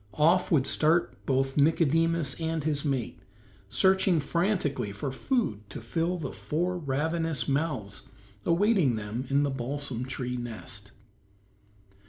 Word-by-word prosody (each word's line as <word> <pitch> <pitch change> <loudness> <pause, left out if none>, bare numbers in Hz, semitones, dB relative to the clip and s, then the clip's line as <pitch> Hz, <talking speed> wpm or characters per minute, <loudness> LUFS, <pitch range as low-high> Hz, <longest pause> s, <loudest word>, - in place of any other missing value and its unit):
Off 170 +4 +4
would 140 -6 +4
start 165 +3 +1
both 135 +1 +1
Nicodemus 165 0 +3
and 160 -1 -1
his 150 -2 0
mate, 135 -5 -2 0.5
searching 190 - +3
frantically 150 - 0
for 105 +7 -4
food 130 - -1
to - - -6
fill 165 +10 -1
the 150 -6 -4
four 175 +4 -2
ravenous 160 -1 -1
mouths 135 -9 -1 0.4
awaiting 175 - +3
them 110 +2 -4
back 130 - -9
in 140 +1 +3
the 140 - 0
balsam 135 -1 -3
tree 125 -1 -3
nest. 110 -3 -7
145 Hz, 130 wpm, -28 LUFS, 130-165 Hz, 0.5 s, Off